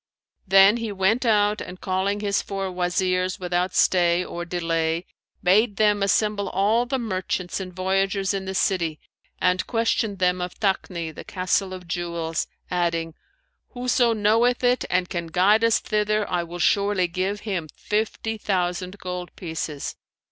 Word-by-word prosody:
Then 195 +3 +7
he 230 -2 -3
went 205 +6 +1
out 210 -1 +3
and, 180 - -8
calling 195 +2 -1
his 200 -1 +1
four 195 -1 -4
Wazirs 185 +1 0
without 180 0 -1
stay 175 -1 +3
or 175 0 -5
delay, 165 -1 -1 0.4
bade 205 +4 +4
them 210 -1 +3
assemble 200 +1 +1
all 215 +6 +2
the 265 +1 0
merchants 185 -5 -3
and 185 -1 -6
voyagers 195 +2 0
in 195 -1 -3
the 190 0 -4
city 170 -5 0 0.4
and 180 0 +1
question 225 -2 0
them 180 -1 +1
of 180 0 -5
Takni, 180 -5 -1
the - - -9
Castle 185 +1 -1
of 185 -2 -8
Jewels, 170 -2 -2 0.2
adding, 170 -2 0 0.6
'Whoso 245 -1 +2
knoweth 225 +4 +2
it 245 +1 +2
and 180 0 +1
can 170 -2 -4
guide 195 +7 +3
us 230 -1 +4
thither, 210 0 0
I 175 -1 0
will 170 +1 -8
surely 200 0 +2
give 190 +4 -2
him 190 -7 -3
fifty 220 +1 -2
thousand 185 -1 -1
gold 180 -1 -6
pieces.' 160 -4 -5
190 Hz, 150 wpm, -24 LUFS, 180-210 Hz, 0.6 s, Then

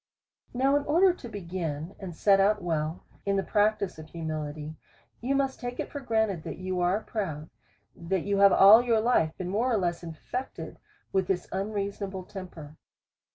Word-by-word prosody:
Now 265 +3 +2
in 290 - -1
order 350 +5 +4
to 250 -9 -10
begin, 170 -4 -4
and 185 -4 -7
set 195 +3 +4
out 205 0 +3
well 160 -1 -2 0.2
in 200 0 0
the 195 - +1
prac 210 +1 +2
tice 190 -5 -5
of 155 - -10
humility, 155 -2 -5 0.5
you 265 +4 0
must 270 -1 0
take 245 0 -5
it - - -4
for 285 - -5
granted, 220 - 0
that - - -7
you 185 0 -3
are 180 +4 +2
proud, 160 -10 -4 0.4
that 170 +1 -2
you 200 0 +1
have 200 0 +7
all 205 +4 +8
your 235 -2 +2
life 215 -9 +2
been 185 -2 -4
more 230 +7 +1
or 225 - +3
less 175 -3 -1
infected 170 +10 -6 0.3
with 190 -1 +1
this 185 -2 -1
unreasonable 200 -1 -3
temper. 175 -6 -10
195 Hz, 180 wpm, -28 LUFS, 170-220 Hz, 0.5 s, all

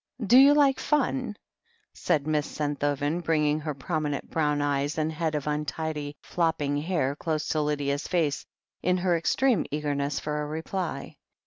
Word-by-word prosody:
"Do 230 - +5
you 280 +2 +8
like 280 -3 +4
funf" 260 -6 0 0.6
said 145 -3 0
Miss 150 -1 0
Senthoven, 145 +2 -1
bringing 150 -2 +2
her 150 -1 -4
prominent 150 0 -3
brown 150 -2 +1
eyes 145 +1 0
and 155 0 0
head 160 -1 -2
of 150 - -2
untidy, 150 0 -3
flopping 160 -4 0
hair 145 -3 0
close 155 0 -2
to 155 - +1
Lydia's 145 -1 -1
face 165 -6 0 0.4
in 180 +1 +2
her 180 -1 +2
extreme 240 +8 +2
eagerness 145 -1 -1
for 150 0 -3
a 150 - -3
reply. 160 -1 -4
150 Hz, 150 wpm, -27 LUFS, 145-170 Hz, 0.6 s, you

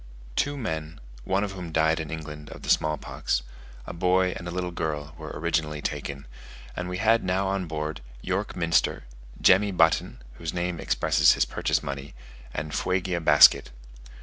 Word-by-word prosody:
Two 145 0 0
men, 80 - -4 0.3
one 95 +1 +1
of 100 - -3
whom 90 -3 -7
died 80 +1 +2
in 80 -2 -5
England 75 -2 -7
of - - -11
the - - 0
small 75 0 +2
pox, - - -2 0.4
a - - -7
boy 90 +1 +2
and 85 - -7
a - - -4
little 90 0 -3
girl, 75 -3 -3
were 80 -2 -8
originally 75 -1 -1
taken; 70 -1 -4 0.5
and 90 0 -4
we 90 - -3
had 115 +3 +3
now 95 +1 0
on 95 -2 -1
board, 75 -2 -4 0.2
York 95 +8 -3
Minster, 85 -2 +1 0.4
Jemmy 100 +2 +5
Button 80 -3 +2 0.2
(whose 80 0 -4
name 90 -1 -2
expresses - - +3
his - - +2
purchase - - -1
money), 70 -1 -6 0.4
and 75 +2 -5
Fuegia 90 -1 0
Basket. 75 -2 +7
85 Hz, 170 wpm, -26 LUFS, 75-90 Hz, 0.5 s, Basket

